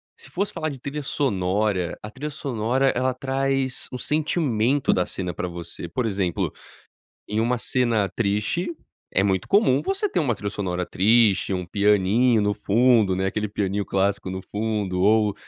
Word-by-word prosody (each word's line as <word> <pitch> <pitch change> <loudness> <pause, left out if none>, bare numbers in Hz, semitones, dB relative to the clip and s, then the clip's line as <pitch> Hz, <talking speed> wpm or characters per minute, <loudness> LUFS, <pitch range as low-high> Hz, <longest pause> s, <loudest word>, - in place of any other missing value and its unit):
se - - -13
fosse 200 +3 -1
falar 155 0 -2
de 135 - -8
trilha 140 +4 -5
sonora, 100 - 0
a 105 - -6
trilha 145 +6 -5
sonora 130 -1 0
ela 130 +1 +1
traz 135 0 -1
o 125 - -4
sentimento 145 -4 +1
da 90 - +1
cena 90 -2 -4
pra 90 - -3
você, 85 -1 -7
por 115 +8 -2
exemplo, 95 -5 -1 0.8
em 105 - -2
uma 120 +2 +1
cena 115 -5 +1
triste 105 - 0 0.5
é - - +5
muito 95 -2 0
comum 195 - +4
você 390 - -1
ter - - -1
uma 140 -8 +1
trilha 100 0 -4
sonora 90 -3 -2
triste, 105 +1 +3
um 90 -1 -2
pianinho 105 +4 +3
no 105 0 +1
fundo, 110 -2 +3
né, 95 +1 0
aquele 105 +2 -1
pianinho 100 0 -1
clássico 100 0 0
no 95 0 -5
fundo 105 -4 -2
ou 105 +1 +3
110 Hz, 165 wpm, -24 LUFS, 95-130 Hz, 0.8 s, é